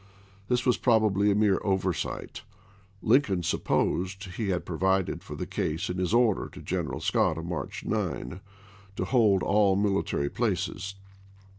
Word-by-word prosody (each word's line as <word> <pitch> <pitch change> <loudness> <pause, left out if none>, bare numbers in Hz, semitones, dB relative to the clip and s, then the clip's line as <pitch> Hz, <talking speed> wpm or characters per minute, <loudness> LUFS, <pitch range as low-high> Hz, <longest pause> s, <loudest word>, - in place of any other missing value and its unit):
This 125 0 +1
was 125 - +3
probably 105 -4 +3
a 100 - +3
mere 105 -2 +3
oversight; 95 -3 -2 0.6
Lincoln 110 -7 +3
supposed 95 +4 0
he 95 +3 -4
had 90 -2 -1
provided 95 +2 0
for - - -8
the - - -4
case 80 +3 -2
in 90 - -4
his 90 0 0
order 115 -3 +2
to - - -12
General - - -2
Scott 80 - +1
of 80 - -5
March 85 -6 -5
9 65 +10 -3 0.5
to - - -2
hold 110 -7 +3
all 100 -1 +3
military 100 -7 0
places. 95 -3 -2
95 Hz, 145 wpm, -28 LUFS, 90-105 Hz, 0.6 s, was